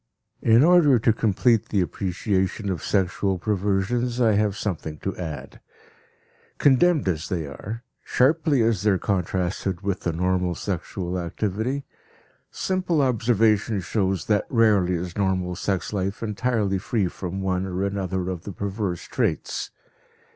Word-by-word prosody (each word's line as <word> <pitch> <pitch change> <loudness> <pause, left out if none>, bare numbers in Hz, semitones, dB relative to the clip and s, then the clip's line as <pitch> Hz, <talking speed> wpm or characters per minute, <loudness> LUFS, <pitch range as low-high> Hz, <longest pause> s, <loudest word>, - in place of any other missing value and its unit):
In 115 +3 +5
order 165 -6 +6
to 115 0 +3
complete 110 +1 +2
the 100 - +1
appreciation 95 +2 -1
of 90 - -3
sexual 95 0 0
perversions, 105 +6 0
I 115 -3 +4
have 105 -1 +1
something 80 -7 -4
to 95 - -4
add. 75 -6 -7 1.0
Condemned 145 - +4
as 80 -3 -1
they 85 -4 -2
are, 105 - -7 0.2
sharply 145 -1 +2
as 110 -5 +1
they 105 - +2
are 95 - +3
contrasted 90 -1 -1
with 100 -2 -1
the 85 - -1
normal 90 +1 0
sexual 90 -1 -3
activity, 110 +10 -2 0.7
simple 185 -4 -1
observation 115 -4 +2
shows 95 -3 -1
that 105 -2 +1
rarely 105 -6 +3
is 85 0 -4
normal 95 -3 0
sex 95 +3 -2
life 100 +2 -2
entirely 105 -3 0
free 100 0 0
from 90 +2 -5
one 95 0 0
or 95 +1 -2
another 95 -2 -2
of 90 -3 -5
the 100 - -7
perverse 100 -3 -3
traits. - - -2
100 Hz, 140 wpm, -24 LUFS, 90-115 Hz, 1.0 s, order